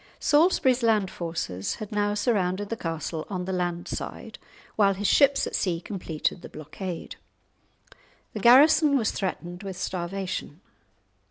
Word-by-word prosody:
Salisbury's 290 -5 +3
land 215 -5 +2
forces 165 - -4
had 215 - -8
now 205 0 0
surrounded 205 -3 0
the 230 - -2
castle 165 -4 -4
on 180 -3 -3
the 190 - -3
land 175 -1 -2
side, - - -6 0.4
while 200 -2 +3
his 205 +2 -5
ships 280 +5 +4
at - - -6
sea 175 -3 0
completed 175 -3 -3
the - - -10
blockade. 165 +3 -7 1.2
The - - -4
garrison 280 +4 +6
was 225 -4 0
threatened 175 -2 -4
with 195 -3 -6
starvation. 185 -2 -4
190 Hz, 140 wpm, -26 LUFS, 175-220 Hz, 1.2 s, garrison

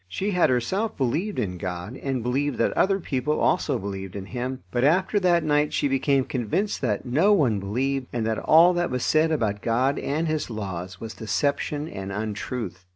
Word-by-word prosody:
She 195 - -2
had 180 -2 +3
herself 185 - 0
believed 160 - -1
in 90 -7 -2
God, 90 +5 -5
and 135 -3 -3
believed 135 +2 0
that - - +1
other 195 +1 +2
people 150 -2 -1
also 140 -4 +2
believed 95 -3 -6
in 100 -2 -5
Him; 125 +3 -4
but 120 0 0
after 185 +8 +3
that 175 -3 +3
night 150 -1 +1
she - - +1
became 135 0 +2
convinced 130 - -2
that 105 -6 -1
no 160 +12 +3
one 125 - +2
believed, 130 +7 -1
and 115 -2 -2
that 110 -1 0
all 170 +3 +6
that 175 0 0
was 125 -1 -2
said 160 +1 +3
about 105 -9 0
God 125 +4 +1
and 155 +4 -1
His 155 -3 -1
laws 95 -4 -5
was 115 -1 -6
deception 145 +6 -1
and 95 -8 -6
untruth. 105 -1 -4
130 Hz, 190 wpm, -25 LUFS, 110-155 Hz, -, all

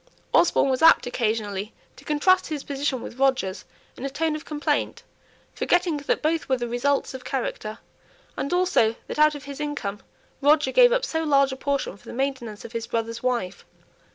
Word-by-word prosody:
Osborne 275 -5 +4
was 260 - -1
apt 325 0 +7
occasionally 215 -4 -2 0.2
to - - -15
contrast 365 +5 +3
his 300 -3 -4
position 275 -3 -2
with 245 - -9
Roger's 260 -8 +1 0.3
in - - -9
a 275 - -2
tone 305 +3 -1
of 305 - -6
complaint, 300 -1 -1 0.5
forgetting 350 -3 +1
that 285 +1 -1
both 320 -1 0
were 260 - +2
the 240 -1 -3
results 270 +5 0
of 260 -1 -8
character, 220 -5 -4 0.6
and 280 - -3
also 355 -11 +2
that - - -6
out 305 0 +5
of 290 - -8
his 280 0 -8
income 280 -9 -4 0.4
Roger 290 -1 +4
gave - - +6
up - - +1
so 320 0 -2
large 275 -3 +3
a - - -4
portion 280 -6 -2
for - - -23
the - - -7
maintenance 245 -5 -3
of 230 - -9
his 230 -1 -4
brother's 230 0 -3
wife. 240 -7 -2
275 Hz, 185 wpm, -24 LUFS, 235-300 Hz, 0.6 s, apt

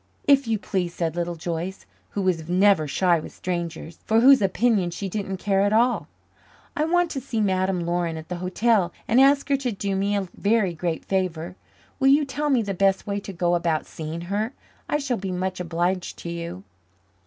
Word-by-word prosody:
"If 280 -3 +4
you 225 -1 +1
please," 180 -4 -3
said 165 -2 -2
Little 175 0 -2
Joyce, 170 +3 -4 0.2
who 200 - -3
was 170 -3 0
never 185 -3 +4
shy 175 +4 +2
with - - -9
strangers, 170 -2 -4
for 220 +1 +3
whose 265 +1 +7
opinion 200 -1 +2
she 185 +3 -5
didn't 195 -1 -3
care 195 0 +1
at 200 +1 +2
all, 240 +3 +2 0.7
"I 300 - +1
want 350 +1 +2
to 270 - -3
see 235 -3 -3
Madame 190 -2 +1
Laurin 170 -1 -1
at 160 0 -9
the 180 - -4
hotel 185 +1 +1 0.2
and 240 +3 +5
ask 280 +1 +4
her 280 - +3
to 260 -3 -2
do 200 -1 -2
me 200 +2 0
a 195 -2 -1
very 205 -3 +1
great 165 0 -3
favour. 180 -2 -2 0.4
Will 270 - +3
you 285 +2 +5
tell 290 +3 -2
me 255 -5 +3
the 200 -1 -3
best 195 +1 +2
way 200 0 -2
to 200 - -8
go 175 -1 0
about 170 -2 0
seeing 160 +1 -6
her? 205 +7 -2 0.4
I - - +2
shall 275 -5 -1
be 190 0 -4
much 185 +1 -2
obliged 175 +1 -1
to 170 - -6
you." 170 - -6
190 Hz, 200 wpm, -24 LUFS, 175-225 Hz, 0.7 s, whose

